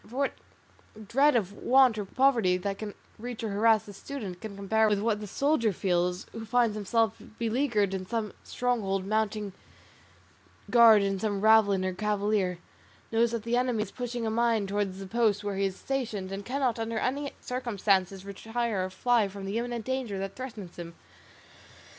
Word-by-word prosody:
For 240 +4 -9
what 280 0 +1 0.7
dread 275 +6 +4
of 200 -4 0
want 255 +2 +4
or 205 - -3
poverty 230 -6 +3
that 195 +2 -4
can 210 -2 -6 0.2
reach 240 0 -6
or 220 - -1
harass 215 +1 +3
the 205 - -10
student 200 -6 -7
can 215 -2 -7
compare 215 +2 +2
with 210 - +2
what 210 0 0
the 210 - -6
soldier 275 0 +1
feels, 180 -1 0
who 225 - -7
finds 230 0 +2
himself 220 +2 0 0.2
beleaguered 225 -4 +1
in 185 -1 -4
some 225 -2 -2
stronghold 205 -6 -1
mounting 210 -1 -1 1.2
guard 230 -4 +7
in 195 -1 -1
some 205 -1 -1
ravelin 205 -3 +4
or 185 - -1
cavalier, 205 -2 0 0.5
knows 230 +1 +3
that 230 -2 -3
the 235 +1 0
enemy 245 -3 +1
is - - -10
pushing 245 -2 -4
a 220 - 0
mine 230 -2 +2
towards 195 -1 -2
the 195 - -7
post 215 0 +1
where 205 -1 -2
he 195 - +1
is 190 -1 -2
stationed, 225 -9 -3
and 195 +1 -5
cannot 255 -3 0
under 225 0 -2
any 280 +5 -1
circumstances 200 -6 0
retire 225 0 -2
or - - -5
fly 225 +3 +2
from 195 0 -8
the 200 +4 -1
imminent 240 -2 -4
danger 260 -6 -2
that 195 0 -4
threatens 220 -9 -8
him? 170 -1 -8
215 Hz, 175 wpm, -28 LUFS, 195-235 Hz, 1.2 s, guard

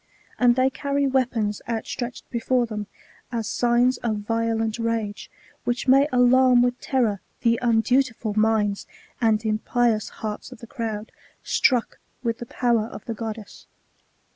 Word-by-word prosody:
And 245 -1 +5
they 260 +1 +3
carry 280 +1 -1
weapons 245 -6 0
outstretched 240 +2 -4
before 245 +1 +1
them, 210 -2 -5 0.4
as 230 -3 -2
signs 245 +2 +2
of 215 -3 -2
violent 225 0 -1
rage, 230 -3 -2 0.3
which 245 +2 -2
may 270 +2 +6
alarm 250 0 +5
with 245 0 -1
terror 230 -7 +1 0.2
the 230 -1 +2
undutifal 235 -1 +1
minds 215 -2 +1 0.3
and 220 -1 +2
impious 220 +1 +1
hearts 215 +3 -6
of 255 - -10
the 235 - -11
crowd, 225 -4 -5 0.3
struck 245 -3 +1 0.2
with 230 -1 -1
the 240 - -7
power 235 -3 +1
of - - -10
the 230 - -3
goddess. 220 -1 -7
230 Hz, 140 wpm, -24 LUFS, 220-250 Hz, 0.4 s, may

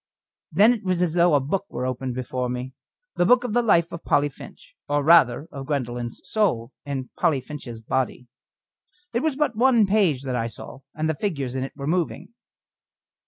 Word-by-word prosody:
Then 210 +9 +6
it 230 - -6
was 185 -2 0
as 170 -3 0
though 170 -2 +4
a - - +5
book 185 +9 -2
were 125 - -4
opened 130 0 -3
before 125 0 -3
me 125 +1 -4 0.4
the 175 - +3
book 250 +2 +5
of 245 -4 -3
the 240 - +3
life 170 -8 +3
of 170 - -7
Polly 145 0 +2
Finch 135 - -14 0.2
or 145 0 +1
rather 150 -3 +5
of 135 -1 -7
Gwendoline's 120 -5 -3
soul 155 - 0
in 135 -3 -5
Polly 145 -4 +2
Finch's 125 -4 -8
body. 125 +1 -2 0.9
It 235 - +2
was 315 -2 0
but 290 -5 0
one 240 -2 +4
page 190 -10 +2
that 130 -2 -2
I 115 -1 -1
saw, 120 +3 -10 0.2
and 155 0 -1
the 160 - +1
figures 140 -8 -3
in 130 - -1
it 135 - -6
were 140 -1 -6
moving. 170 +2 -1
145 Hz, 195 wpm, -24 LUFS, 130-190 Hz, 0.9 s, Then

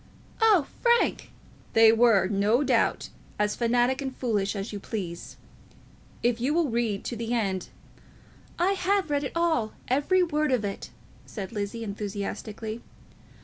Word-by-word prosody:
"Oh, 415 -9 +5 0.2
Frank!" 475 -1 +2 0.4
"They 225 0 +7
were, 225 -4 +4
no 210 +6 +2
doubt, 250 -4 +1 0.3
as 210 0 0
fanatic 245 +3 +1
and 265 -2 -5
foolish 210 -5 -1
as 200 +2 -5
you 205 - -4
please. 180 -5 -6 0.9
If 240 -1 +1
you 280 +5 +1
will 330 -6 +1
read 225 -4 -1
to 240 - -4
the 230 +1 -2
end 195 -5 -1 0.4
" - - -26
"I 360 +3 +2
have 390 -3 0
read 285 0 +1
it - - -5
all, 325 -11 +1
every 290 +8 +2
word 305 -3 0
of 240 -5 +1
it," 200 - -5 0.4
said 195 -4 -6
Lizzie, 210 +1 -4
enthusiastically. 210 +2 -5
235 Hz, 145 wpm, -27 LUFS, 205-285 Hz, 0.9 s, They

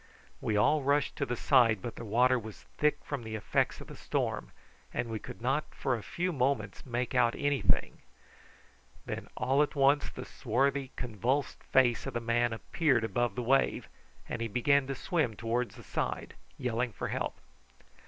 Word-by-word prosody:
We 105 -2 0
all 150 +9 +4
rushed 140 +1 +1
to 140 - -1
the 120 - -1
side, 120 -5 +4
but 115 +5 -6
the - - -7
water 125 +4 +3
was 110 -2 -10 0.2
thick 150 0 +3
from 145 -3 -3
the 110 -1 -5
effects 110 - 0
of - - -9
the - - -10
storm, - - -2 0.4
and 120 -1 -2
we 110 - -2
could 115 - -10
not 135 +5 +1
for 130 - 0
a 115 - -5
few 180 - -2
moments 130 -4 -1
make 120 0 -2
out 120 -2 +3
anything. 145 -5 +1 1.1
Then - - -5
all 135 +3 +3
at 150 - 0
once 140 +1 +4
the 125 - -8
swarthy, 135 +3 0
convulsed 125 +4 -1
face 125 -3 +3
of - - -5
the - - +1
man 120 +1 +1
appeared 130 +2 +1
above 115 0 0
the 125 - -2
wave, 135 +3 +2 0.4
and - - -4
he 115 - 0
began 135 +5 +3
to 135 - -2
swim 150 - 0
towards 115 +2 -1
the - - -12
side, - - -3 0.2
yelling 120 -1 -1
for 95 - -4
help. - - -2
125 Hz, 180 wpm, -31 LUFS, 115-140 Hz, 1.1 s, all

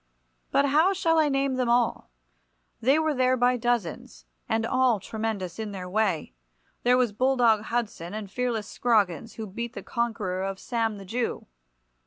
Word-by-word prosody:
But 280 - +3
how 310 +7 +4
shall 330 -4 +2
I 305 -2 +3
name 275 -1 0
them 250 -2 0
all? 240 -1 +1 0.7
They 265 +6 +4
were 315 -1 +1
there 255 -1 +2
by 250 +1 +3
dozens, 220 - -2 0.2
and 225 0 +1
all 255 -2 +2
tremendous 215 -3 -4
in 215 -2 -4
their 185 -2 -6
way. 185 - 0 0.5
There 250 +1 +4
was 250 -4 +2
Bulldog 235 -2 +3
Hudson, 210 -6 -3
and 210 -3 -6
fearless 235 -3 -2
Scroggins, 220 -3 +1
who 220 - -6
beat 235 +4 -5
the - - -7
conqueror 220 -6 -2
of 195 0 -3
Sam 225 -1 -2
the 195 - -10
Jew. 235 +5 -2
230 Hz, 165 wpm, -26 LUFS, 205-255 Hz, 0.7 s, how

